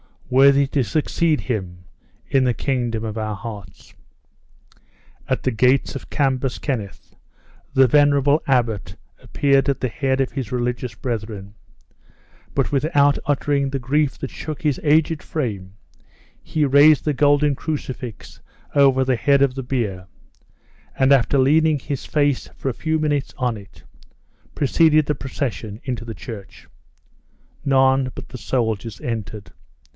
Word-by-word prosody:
worthy 140 +2 +5
to 135 0 -1
succeed 155 +5 0
him 90 -7 -4 0.4
in 135 -1 +2
the 125 - +2
kingdom 120 -4 -2
of 110 0 -4
our 110 -1 -3
hearts." 100 -4 -10 1.3
At - - -1
the 130 - +1
gates 125 +4 +2
of 135 - -8
Cambus 135 -3 0
Kenneth, 110 -9 -5 0.6
the 130 - +6
venerable 145 +2 +3
abbot 115 -8 0 0.3
appeared 140 -1 +1
at 140 - -1
the 130 - 0
head 135 +2 -1
of 130 - -1
his 130 -7 -5
religious 125 -1 -2
brethren; 110 -4 -5 1.0
but - - 0
without 145 0 +2
uttering 145 -1 0
the 135 - -2
grief 135 +3 0
that 135 - -5
shook 155 -2 -6
his 150 -4 +1
aged 155 +1 +2
frame, 100 -10 -4 0.7
he 155 -1 -1
raised 145 +2 +6
the 150 - +1
golden 145 +1 +3
crucifix 130 -6 -6 0.3
over 135 -2 +4
the 130 -1 +1
head 140 +2 +3
of 135 -2 +2
the 135 - -5
bier, 105 -8 -3 0.9
and 135 +1 +3
after 140 0 +4
leaning 155 +3 +3
his 140 0 -5
face 145 -3 +1
for 135 - -3
a - - -3
few 160 +5 -1
minutes 145 -3 -1
on 125 -3 -1
it, 100 -1 -15 0.7
preceded 155 +1 +3
the 150 - 0
procession 130 -6 -5
into 120 -3 -4
the 115 -1 -7
church. 100 -2 -10 1.0
None 135 -1 +3
but - - -9
the 125 - -8
soldiers 115 -3 -2
entered. 110 -3 -5
135 Hz, 140 wpm, -21 LUFS, 115-145 Hz, 1.3 s, the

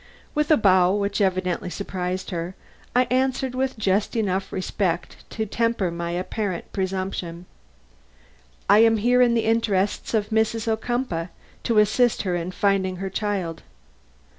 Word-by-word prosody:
With 300 0 0
a 310 - +6
bow 185 -3 +4
which 205 +1 -1
evidently 185 -2 0
surprised 185 0 -4
her, 175 +1 -4 0.4
I 250 - +6
answered 260 0 +1
with 260 0 -1
just 200 +1 0
enough 195 -3 -1
respect 185 -2 -2
to 220 - -3
temper 225 -4 0
my 170 0 -4
apparent 185 +1 -3
presumption: 185 -2 -3 1.2
"I 205 - +6
am 225 0 +5
here 245 +4 +3
in 240 -1 +4
the 230 - +1
interests 220 -2 +1
of 210 -1 0
Mrs. 220 +1 0
Ocumpaugh, 220 -6 -1 0.4
to 230 -3 +1
assist 215 +3 +3
her 185 -3 -1
in 170 0 -3
finding 190 0 +1
her 190 +1 -5
child. 195 -5 -2
200 Hz, 140 wpm, -24 LUFS, 185-225 Hz, 1.2 s, a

